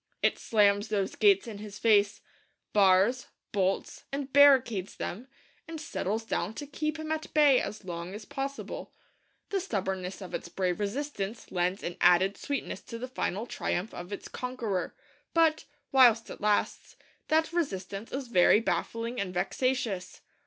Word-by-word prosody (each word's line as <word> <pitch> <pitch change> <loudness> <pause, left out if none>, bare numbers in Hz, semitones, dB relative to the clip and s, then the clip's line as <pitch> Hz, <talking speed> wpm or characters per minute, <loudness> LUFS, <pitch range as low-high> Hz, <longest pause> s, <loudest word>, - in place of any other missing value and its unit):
It - - +2
slams 205 -1 +3
those 200 -3 -1
gates 200 -2 +4
in 215 -3 -7
his 210 -1 -8
face; 205 -2 +3 0.5
bars, 200 +5 +4 0.2
bolts, 195 -1 -1
and 275 -1 -4
barricades 260 -9 +5
them; 230 +8 -5 0.4
and 325 -1 -6
settles 225 -8 -3
down 215 -1 -2
to 290 - -5
keep 305 +2 -3
him 315 0 -5
at 315 0 -3
bay 290 -4 +6
as 210 -2 -6
long 175 +1 -5
as 210 0 -8
possible. 275 +4 -5 0.6
The 395 - +1
stubbornness 190 - -3
of 185 -3 -9
its - - -4
brave 180 0 -1
resistance 210 -1 -4
lends 180 +2 0
an 175 - -4
added 190 +3 +5
sweetness 280 +6 -4
to 230 - -7
the 250 +2 -5
final 225 -4 -2
triumph 205 -3 -3
of 175 +2 -8
its 200 - -6
conqueror; 235 -7 -3 0.4
but, 320 -1 +3 0.3
whilst 240 -4 +5
it - - -9
lasts, 210 0 0 0.3
that 320 +1 +2
resistance 200 - -3
is 270 -1 -4
very 205 -2 +5
baffling 230 +1 -2
and 190 -2 -3
vexatious. 210 0 -1
215 Hz, 150 wpm, -29 LUFS, 195-265 Hz, 0.6 s, bay